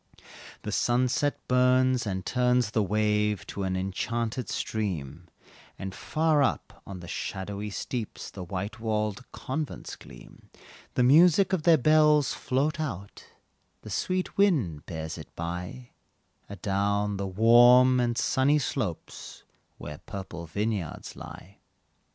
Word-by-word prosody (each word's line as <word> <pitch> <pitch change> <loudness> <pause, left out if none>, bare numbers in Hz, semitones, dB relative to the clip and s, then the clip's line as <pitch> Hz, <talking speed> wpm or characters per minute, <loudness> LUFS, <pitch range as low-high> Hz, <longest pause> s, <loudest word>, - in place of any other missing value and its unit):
The - - -4
sunset 130 +4 0
burns, 125 -1 +3
and 95 -2 -3
turns 125 -3 +2
the 110 - +1
wave 105 0 +1
To 100 - -6
an 95 -1 -1
enchanted 115 +6 -3
stream, 85 -7 -4 0.5
And 95 0 -6
far 155 +3 +1
up 135 - -1
on 95 -2 -7
the 85 - -10
shadowy 100 +4 -4
steeps 110 +2 -5
The 95 - -7
white 100 +5 -5
walled 110 0 -2
convents 150 +2 -5
gleam, - - -15 0.5
The 125 - +3
music 175 +8 +5
of 185 - +1
their 165 0 +5
bells 150 0 +4
float 145 +5 -1
out 100 - -6 0.6
The - - -9
sweet 185 +1 -2
wind 125 - +2
bears 80 -2 -5
it - - -10
by, 90 +9 -6 0.6
Adown 100 +1 -1
the 100 0 -3
warm 120 +5 +6
and 120 -1 0
sunny 135 +4 +2
slopes, 125 - -4 0.3
Where 75 -1 -8
purple 90 -3 -7
vineyards 105 -2 -3
lie. 100 +2 -11
110 Hz, 125 wpm, -27 LUFS, 95-130 Hz, 0.6 s, warm